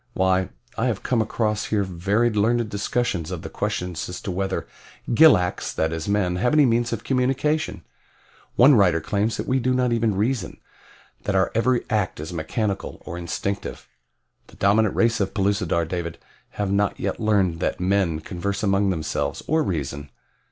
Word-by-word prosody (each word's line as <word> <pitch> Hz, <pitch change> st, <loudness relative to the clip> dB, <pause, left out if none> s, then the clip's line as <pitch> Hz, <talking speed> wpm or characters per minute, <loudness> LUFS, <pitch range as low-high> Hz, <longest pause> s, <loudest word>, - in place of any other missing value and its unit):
Why, 95 Hz, 0 st, +2 dB, 0.3 s
I 120 Hz, -, +2 dB
have 110 Hz, -6 st, -2 dB
come 120 Hz, -3 st, +1 dB
across 110 Hz, 0 st, -1 dB
here 105 Hz, -2 st, 0 dB
very 100 Hz, +6 st, +1 dB
learned 110 Hz, +2 st, +1 dB
discussions 100 Hz, -5 st, -1 dB
of -, -, -5 dB
the -, -, -7 dB
question 90 Hz, 0 st, -2 dB
as 90 Hz, +2 st, -5 dB
to 95 Hz, -, -4 dB
whether 95 Hz, +1 st, -2 dB, 0.5 s
gilaks, 100 Hz, -, +4 dB
that 80 Hz, +1 st, 0 dB
is 80 Hz, +2 st, -4 dB
men, 95 Hz, -3 st, +1 dB
have 125 Hz, +8 st, +1 dB
any 150 Hz, -2 st, +6 dB
means 120 Hz, 0 st, +1 dB
of 115 Hz, -2 st, -3 dB
communication. 135 Hz, +4 st, 0 dB, 0.7 s
One 135 Hz, +4 st, +7 dB
writer 95 Hz, -8 st, +4 dB
claims 105 Hz, +5 st, -1 dB
that -, -, -3 dB
we 130 Hz, +1 st, +1 dB
do 130 Hz, +1 st, +1 dB
not 125 Hz, -1 st, +1 dB
even 115 Hz, -3 st, +1 dB
reason 115 Hz, +5 st, -1 dB, 0.7 s
that 100 Hz, -, 0 dB
our 95 Hz, 0 st, +2 dB
every 120 Hz, +2 st, +1 dB
act 105 Hz, -7 st, -1 dB
is 80 Hz, +3 st, -6 dB
mechanical, 100 Hz, +5 st, -3 dB
or -, -, -6 dB
instinctive. 90 Hz, +3 st, -4 dB, 0.6 s
The -, -, -17 dB
dominant 105 Hz, +1 st, +2 dB
race 115 Hz, 0 st, +2 dB
of 100 Hz, -2 st, -2 dB
Pellucidar, 95 Hz, -4 st, +1 dB
David, 85 Hz, -1 st, -4 dB, 0.4 s
have 100 Hz, -2 st, -1 dB
not 100 Hz, 0 st, +1 dB
yet -, -, -2 dB
learned 100 Hz, -6 st, +1 dB
that -, -, -1 dB
men 90 Hz, -4 st, +1 dB
converse 100 Hz, +5 st, -4 dB
among 100 Hz, 0 st, +2 dB
themselves, 80 Hz, -5 st, -2 dB
or 160 Hz, +1 st, +2 dB
reason. 70 Hz, -, -3 dB
100 Hz, 170 wpm, -23 LUFS, 90-115 Hz, 0.7 s, One